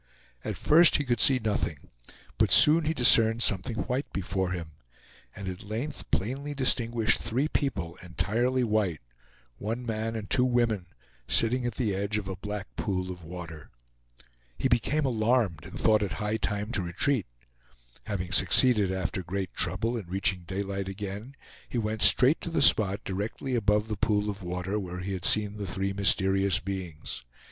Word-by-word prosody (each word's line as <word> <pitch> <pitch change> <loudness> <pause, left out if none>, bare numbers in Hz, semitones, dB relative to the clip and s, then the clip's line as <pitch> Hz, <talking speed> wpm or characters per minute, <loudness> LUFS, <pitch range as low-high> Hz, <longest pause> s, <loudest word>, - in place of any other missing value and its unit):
At - - -4
first 165 +3 +5
he 145 - +2
could 120 -4 -1
see 130 +5 +5
nothing, 105 - -3 0.5
but - - +3
soon 155 +2 +6
he 160 - +1
discerned 115 -3 +5
something 100 +4 +1
white 130 +3 -3
before 95 0 -2
him, 85 -3 -5 0.6
and 100 - -7
at 95 +2 -5
length 110 +8 -6
plainly 135 +9 -2
distinguished 120 -4 +2
three 125 +6 -1
people, 95 - -2
entirely 120 +8 0
white; 105 - 0 0.6
one 115 +4 -4
man 115 0 -3
and 105 -2 -5
two 125 - +2
women, 120 -7 +1 0.4
sitting 120 +2 +1
at 120 - -4
the 110 -6 -1
edge 100 +2 -2
of 105 -3 -5
a 95 - -4
black 100 -9 -7
pool 90 +3 -2
of 90 -1 -9
water. 80 -3 -9 0.9
He - - +1
became 135 +4 +1
alarmed 110 - 0
and - - -8
thought 110 -1 +3
it 100 - -2
high 105 +1 -2
time 105 0 -3
to 110 - 0
retreat. 100 +7 0 0.8
Having 95 -4 -4
succeeded, 100 +1 +4
after 95 -1 -2
great 95 +1 -4
trouble, 115 +2 0
in 105 -6 -7
reaching 95 -1 -1
daylight 95 0 -3
again, 105 +6 -7 0.3
he - - -4
went 110 -1 -2
straight 125 - +6
to - - -5
the 165 - +1
spot 100 -2 +4
directly 105 +7 -4
above 105 -2 +1
the 110 - -3
pool 105 -1 0
of 100 0 -9
water 90 +3 -3
where 90 -2 -6
he 95 +2 -4
had 90 -2 -3
seen 105 +1 +3
the 100 -2 -5
three 95 +2 -2
mysterious 95 0 +2
beings. 90 -9 -6
105 Hz, 170 wpm, -28 LUFS, 95-120 Hz, 0.9 s, soon